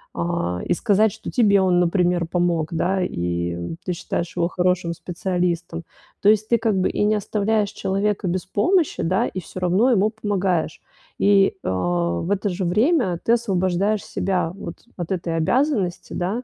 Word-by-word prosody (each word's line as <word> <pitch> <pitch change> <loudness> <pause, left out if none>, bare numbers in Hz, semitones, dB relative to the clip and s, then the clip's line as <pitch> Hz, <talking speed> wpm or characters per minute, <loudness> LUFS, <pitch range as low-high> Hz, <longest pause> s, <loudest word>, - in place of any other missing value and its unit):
Э, 90 - -2
и - - +1
сказать, 210 +2 +2
что - - -8
тебе 205 -5 +4
он, 180 -1 +3
например, 175 -1 +1
помог, 170 -2 0
да, 190 +3 0
и 85 - -3
ты 180 - -2
считаешь 170 0 -4
его 170 - +2
хорошим 180 -1 0
специалистом. 170 -1 -2 0.4
То 205 - +5
есть 215 0 +3
ты, 235 - +4
как 220 -4 +1
бы, 185 - +1
и - - -1
не 210 +1 +3
оставляешь 210 0 0
человека 195 0 -1
без 180 +1 -2
помощи, 310 - +1
да, 190 +8 +1
и 185 - -5
всё 185 - -9
равно 185 +8 +3
ему 215 -1 +3
помогаешь. 195 -7 -1 0.4
И, 195 -1 +4
а, 90 -2 0
в 185 - -3
это 205 +1 0
же 185 +1 -3
время 210 - +2
ты 230 - +4
освобождаешь 195 -2 0
себя 180 -4 -1
вот 170 -4 -7 0.2
от 175 +1 -5
этой 170 -2 -2
обязанности, 205 - 0
да, 200 +8 -2
185 Hz, 170 wpm, -22 LUFS, 170-205 Hz, 0.4 s, То